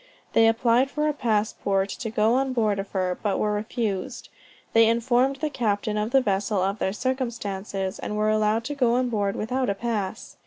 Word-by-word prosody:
They 225 0 +5
applied 235 +3 +3
for 300 +2 -1
a 300 - +1
passport 210 -5 0
to 225 +3 -5
go 215 +1 +2
on 265 +1 +1
board 215 -4 +1
of 195 - -5
her, 185 -2 -1
but 205 -2 0
were 210 0 0
refused. 210 -2 -3 0.4
They 225 0 +6
informed 245 +3 +2
the 305 +3 -2
captain 215 -4 -1
of 210 +1 -1
the 270 +2 +4
vessel 205 -1 0
of 195 +2 -1
their 190 - 0
circumstances, 210 -6 -3
and 210 - -4
were 215 0 +2
allowed 215 +1 +1
to 290 - -4
go 250 -5 +2
on 250 0 +1
board 205 -3 -1
without 250 +2 -1
a 200 - 0
pass. 215 -2 -4
220 Hz, 195 wpm, -25 LUFS, 205-245 Hz, 0.4 s, They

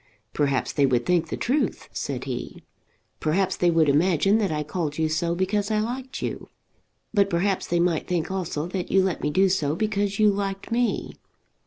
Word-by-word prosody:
"Perhaps 140 -3 0
they 140 -2 +3
would 120 -2 +1
think 175 -2 +2
the - - -3
truth," 280 +5 -1
said - - -4
he. - - -6 0.6
"Perhaps 180 +5 0
they 175 - +3
would 165 -2 +3
imagine 175 +7 +3
that 200 -5 0
I 150 -1 -1
called 150 -1 -3
you 160 -1 +1
so 170 +2 0
because 200 +3 0
I 215 - +1
liked 250 +4 -4
you. - - -4 0.6
But 200 -2 +3
perhaps 190 +2 0
they 175 - +1
might 170 -2 +1
think 175 0 -1
also 175 -5 -2
that 185 -1 -3
you 190 -1 +4
let 185 -4 -1
me 150 - 0
do 190 +5 +3
so 155 -6 0
because 205 0 -1
you 215 -1 +5
liked 195 +1 -4
me. 240 0 0
180 Hz, 190 wpm, -25 LUFS, 160-200 Hz, 0.6 s, you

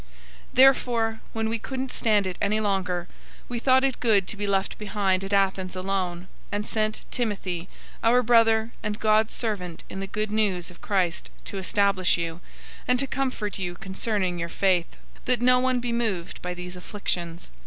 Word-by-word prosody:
003:001 - - -24 0.5
Therefore, 240 -4 +4
when 225 0 -1
we 225 +1 -1
couldn't 265 +2 -4
stand 210 -3 +2
it 185 -1 -3
any 210 +2 +2
longer, 185 -4 -1 0.4
we 240 -1 -3
thought 260 +2 +4
it 270 -2 0
good 205 -6 +3
to - - -5
be 205 0 -3
left 195 -1 0
behind 200 -3 0
at 195 - -5
Athens 190 -2 +1
alone, 185 -2 -2 0.3
003:002 - - -6
and 205 0 -1
sent 215 0 0
Timothy, 190 -7 -2 0.3
our 245 +2 +5
brother 225 -1 +4
and 210 0 -3
God's 215 0 +3
servant 185 -7 -3
in 190 - -5
the 195 - -4
Good 215 +2 -2
News 195 -5 0
of 175 - -17
Christ, 185 -4 0 0.2
to 195 - -4
establish 195 -1 +2
you, 170 0 -4 0.5
and 250 - +4
to 275 - +1
comfort 255 -7 -2
you 175 -2 -3
concerning 190 -2 -1
your 170 0 -3
faith; 180 -2 +2 0.3
003:003 - - -27
that 250 -2 +2
no 250 0 +6
one 255 0 +2
be 240 -1 -2
moved 215 -8 -2
by 180 0 -4
these 180 0 -7
afflictions. 175 -3 -4
205 Hz, 185 wpm, -26 LUFS, 185-225 Hz, 0.5 s, no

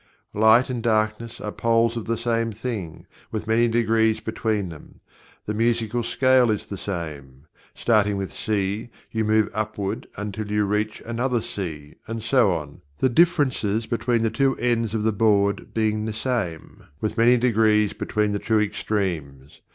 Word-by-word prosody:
Light 110 +4 +5
and 120 -2 -3
Darkness 110 0 0
are 105 - -4
poles 115 +1 +2
of 115 - -4
the 115 0 -1
same 115 -1 0
thing, 105 -7 -5 0.3
with 110 -1 -3
many 115 +2 +3
degrees 115 -1 +2
between 110 -3 -2
them. 80 -3 -12 0.5
The 105 - -2
musical 115 +1 0
scale 125 +2 +3
is 105 -2 -1
the 100 - -6
same 75 -9 -6 0.3
starting 105 -3 +2
with 95 -1 -4
"C" 105 +1 -2 0.2
you 110 -1 0
move 110 0 +3
upward 105 -2 -3
until 105 +1 -5
you 105 0 +1
reach 105 +2 -2
another 120 +2 0
"C" 80 -9 -6
and 115 -1 -5
so 115 -3 +3
on, 75 -5 -5 0.2
the 130 - +2
differences 130 - +2
between 115 0 0
the 115 - +1
two 135 +3 +2
ends 115 -3 0
of 110 - -1
the 110 - +2
board 100 -1 +2
being 110 -1 0
the 110 - -3
same, 105 -9 -3
with 110 0 -2
many 120 +2 +5
degrees 110 -3 +3
between 105 -1 -1
the 100 - -1
two 110 +1 +1
extremes. 85 -10 -3
110 Hz, 160 wpm, -24 LUFS, 105-115 Hz, 0.5 s, Light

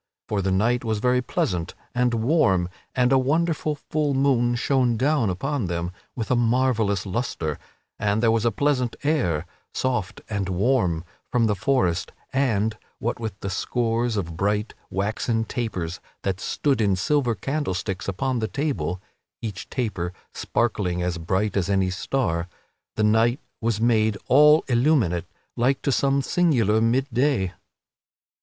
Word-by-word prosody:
For 105 -2 0
the 95 - 0
night 115 +7 +2
was 110 -2 0
very 125 +3 +2
pleasant 90 -7 -2 0.2
and 125 -1 +2
warm 110 - +2 0.3
and 125 0 +3
a 135 - +5
wonderful 155 +2 +1
full 145 -1 -1
moon 125 -3 +3
shone 125 -1 +2
down 135 -3 +2
upon 125 +7 -1
them 85 0 -2 0.2
with 115 -1 -3
a - - +4
marvellous 115 -5 +2
lustre, 90 - -2 0.4
and 100 0 +1
there 115 - +5
was 115 -1 +1
a 120 - +4
pleasant 130 -4 0
air, 90 - +1 0.3
soft 120 -8 -1
and 100 -3 -2
warm, 90 -4 +1 0.3
from 120 -2 +3
the 105 - +2
forest, 95 -4 0 0.2
and, 110 -5 +1 0.2
what 120 +1 -2
with 110 -4 -5
the 100 - -3
scores 115 +2 0
of 85 -4 -3
bright 105 +4 0 0.2
waxen 110 +3 -1
tapers 95 -9 -3 0.2
that 95 -2 -1
stood 135 +2 0
in 100 -3 +3
silver 125 +4 +1
candlesticks 95 -6 -3
upon 125 +6 -1
the 110 - -1
table 100 - -2 0.4
(each 105 -5 -6
taper 95 -9 -2 0.2
sparkling 100 -6 -1
as 90 -1 -2
bright 95 +5 0
as 95 -2 0
any 95 -2 +2
star), 90 -5 -1 0.5
the 110 - 0
night 115 +4 +3 0.2
was 115 -2 0
made 110 -3 +2
all 150 +3 +6
illuminate 120 - +2 0.3
like 130 +3 +2
to 140 - +1
some 140 +1 +2
singular 120 - +2
mid 120 +4 +2
day. 125 -8 +1
115 Hz, 150 wpm, -24 LUFS, 95-130 Hz, 0.5 s, all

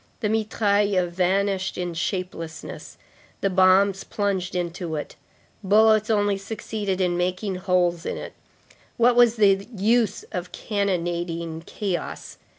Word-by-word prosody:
The 210 - 0
mitraille 205 -3 +1
vanished 190 +2 0
in 175 -1 -3
shapelessness; 170 -2 -5 0.4
the 195 - +1
bombs 190 +1 +4
plunged 195 -3 -2
into 175 -1 -3
it; 150 - -5 0.5
bullets 215 +2 +4
only 205 -2 +2
succeeded 205 -2 -4
in 180 -2 +1
making 185 +3 -1
holes 180 -2 +1
in - - -3
it; - - -7 0.6
what 240 +1 +4
was 240 -1 +5
the 200 -2 +3
use 220 +1 +2
of 180 -3 -5
cannonading 170 -5 -2
chaos? 185 -6 -4
190 Hz, 120 wpm, -24 LUFS, 175-205 Hz, 0.6 s, was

